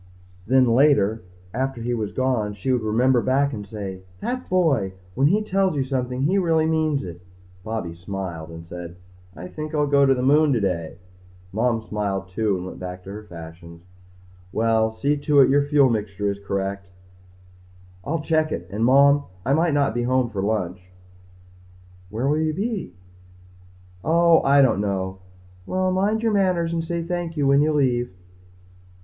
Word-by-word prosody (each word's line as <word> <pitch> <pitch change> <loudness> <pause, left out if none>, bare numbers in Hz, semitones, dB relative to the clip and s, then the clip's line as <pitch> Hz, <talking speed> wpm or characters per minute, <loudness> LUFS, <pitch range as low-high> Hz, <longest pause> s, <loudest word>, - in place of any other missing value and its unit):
Then 130 +2 +5
later, 115 -4 +3 0.3
after 130 +1 -2
he 120 +1 -2
was 110 -3 -2
gone, 120 -6 -1
she 105 +7 -2
would 125 - +1
remember 120 +4 +2
back 140 +3 +1
and 105 -3 -6
say, 100 -3 -6 0.2
That 255 - -4
boy! 150 - +2 0.2
When 135 +6 +3
he 210 +7 +2
tells 195 -4 +1
you 140 - +1
something 130 -1 -2
he 185 +7 +2
really 165 -3 +2
means 155 -3 +1
it. 85 -1 -9 0.4
Bobby 110 -6 -4
smiled 85 -2 -6
and 85 0 -10
said, 85 0 -8 0.4
"I 90 +3 -8
think 155 - -6
I'll 150 -1 +2
go 140 -1 +4
to 135 - +4
the 125 - -2
moon 145 +2 +4
today." 90 -9 -1 0.6
Mom 115 +1 0
smiled 100 -3 -3
too 100 0 0
and 90 - -6
went 95 - -8
back 90 0 -7
to 95 - -9
her 105 +2 -7
fashions. 85 -2 -11 0.7
"Well, 110 0 +2
see 140 +6 0
to 145 0 +2
it 135 - +5
your 145 +1 +4
fuel 145 -2 +4
mixture 105 -3 -1
is 100 - -7
correct." 100 0 -3 1.2
"I'll 160 +2 -2
check 155 0 +1
it. 90 +2 -4
And 105 +3 -2
Mom 140 +3 +5 0.2
I 135 - +2
might 160 0 +2
not 140 -5 +2
be 120 - -1
home 125 0 +1
for 100 -2 -3
lunch." 95 -3 -2 1.3
"Where 115 +6 -2
will 150 +2 +2
you 155 0 0
be?" 200 - -3 1.1
"Oh, 170 0 +4
I 140 0 +5
don't 110 -6 +2
know." 95 -2 -2 0.5
"Well, 185 0 0
mind 205 +4 0
your 225 -2 +2
manners 180 -4 +1
and 165 -1 -1
say 170 0 -3
thank 170 -1 -4
you 145 - +1
when 140 +1 +4
you 155 +1 +2
leave." 125 -5 +1
125 Hz, 175 wpm, -23 LUFS, 100-150 Hz, 1.3 s, Then